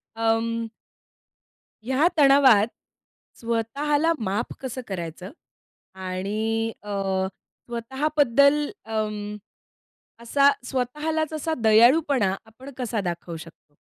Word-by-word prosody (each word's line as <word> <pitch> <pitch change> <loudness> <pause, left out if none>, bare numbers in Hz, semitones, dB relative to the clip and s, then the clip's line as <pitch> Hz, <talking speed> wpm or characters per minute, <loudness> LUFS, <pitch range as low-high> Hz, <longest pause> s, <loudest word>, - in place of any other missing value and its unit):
अं 225 0 0 1.2
ह्या 265 +7 +2
तणावात 270 -7 +6 0.7
स्वतःला 280 +8 0
माफ 210 +3 -2
कसं 260 -1 -5
करायचं 180 0 -6 0.6
आणि 210 +5 -2
अ, 210 - -7 0.8
स्वतःबद्दल 280 +3 +2 0.2
अं, 210 -1 -3 0.9
असा 275 +4 +4 0.2
स्वतःलाच 300 +5 -2
असा 315 +1 -2
दयाळूपणा 235 -1 +4
आपण 250 +5 -12
कसा 235 -4 -2
दाखवू 170 -2 -5
शकतो? 160 -2 -15
230 Hz, 80 wpm, -24 LUFS, 210-280 Hz, 1.2 s, तणावात